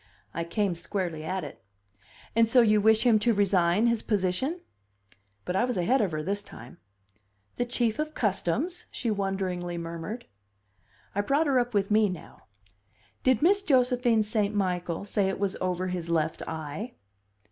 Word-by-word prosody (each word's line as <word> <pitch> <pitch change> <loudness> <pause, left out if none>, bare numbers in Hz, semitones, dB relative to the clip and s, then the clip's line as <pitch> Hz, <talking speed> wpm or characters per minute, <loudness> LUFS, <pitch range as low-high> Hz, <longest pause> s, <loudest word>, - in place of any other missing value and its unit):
I 170 - -2
came 195 +2 0
squarely 170 -2 -4
at 185 +3 -2
it. 145 - -9 0.7
"And 230 -1 +4
so 245 +1 +6
you 215 -2 +4
wish 220 +1 +4
him 230 -4 +5
to 230 +1 +2
resign 195 0 +3
his 235 -2 +2
position?" 210 - -1 0.8
But 180 - -2
I 195 - +3
was 250 -4 -1
ahead 245 +10 +2
of 200 -5 0
her 155 0 -3
this 200 +4 -2
time. 120 - -13 0.8
"The 245 - 0
Chief 240 0 0
of 310 0 -2
Customs?" 225 - -1
she 235 - -2
wonderingly 190 -3 -2
murmured. 170 +8 -6 0.9
I 205 - +1
brought 280 +9 +2
her 270 -3 +3
up 245 -2 -2
with 200 0 +1
me 215 -1 +4
now. 180 -4 -10 0.7
"Did 260 +1 +2
Miss 400 +4 +5
Josephine 250 - +3
St. 210 -1 0
Michael 180 -2 -1
say 200 -2 +1
it 195 - -2
was 200 -1 -1
over 185 0 -1
his 175 -2 -4
left 160 -1 0
eye?" 160 - -5
205 Hz, 165 wpm, -27 LUFS, 180-235 Hz, 0.9 s, so